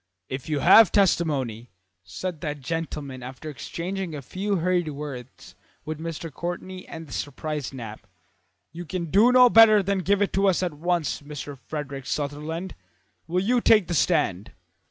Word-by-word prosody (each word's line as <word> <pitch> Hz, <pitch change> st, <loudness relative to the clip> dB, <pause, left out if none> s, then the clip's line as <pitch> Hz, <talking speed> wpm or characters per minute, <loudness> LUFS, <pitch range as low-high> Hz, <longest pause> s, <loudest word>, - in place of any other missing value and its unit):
"If 130 Hz, +3 st, -5 dB
you 150 Hz, -3 st, 0 dB
have 215 Hz, +5 st, +8 dB
testimony," 140 Hz, -, +1 dB, 0.3 s
said 155 Hz, -, -6 dB
that 150 Hz, -2 st, -4 dB
gentleman 150 Hz, -4 st, -4 dB
after 130 Hz, +5 st, -8 dB
exchanging 175 Hz, +5 st, -5 dB
a 140 Hz, -, -7 dB
few 195 Hz, +9 st, -2 dB
hurried 175 Hz, -1 st, +1 dB
words 140 Hz, -4 st, -8 dB, 0.3 s
with 155 Hz, 0 st, -5 dB
Mr. 165 Hz, -1 st, -6 dB
Courtney 185 Hz, +3 st, -6 dB
and 165 Hz, 0 st, -8 dB
the 145 Hz, -, -11 dB
surprised 150 Hz, 0 st, -4 dB
Knapp, 110 Hz, -6 st, -9 dB, 0.6 s
"you 170 Hz, +3 st, -7 dB
can 170 Hz, -2 st, -4 dB
do 215 Hz, +6 st, +6 dB
no 250 Hz, 0 st, +8 dB
better 220 Hz, -3 st, +7 dB
than 195 Hz, 0 st, 0 dB
give 200 Hz, +2 st, +2 dB
it 200 Hz, -, -2 dB
to 195 Hz, +1 st, +2 dB
us 185 Hz, -1 st, +2 dB
at 175 Hz, -3 st, -1 dB
once. 160 Hz, -6 st, -1 dB
Mr. 145 Hz, -1 st, -7 dB
Frederick 140 Hz, -1 st, -6 dB
Sutherland, 155 Hz, +5 st, -3 dB, 0.5 s
will 180 Hz, +3 st, 0 dB
you 245 Hz, +4 st, +2 dB
take 215 Hz, -5 st, +5 dB
the 175 Hz, -, -2 dB
stand?" 150 Hz, -, +1 dB
160 Hz, 160 wpm, -25 LUFS, 145-185 Hz, 0.6 s, have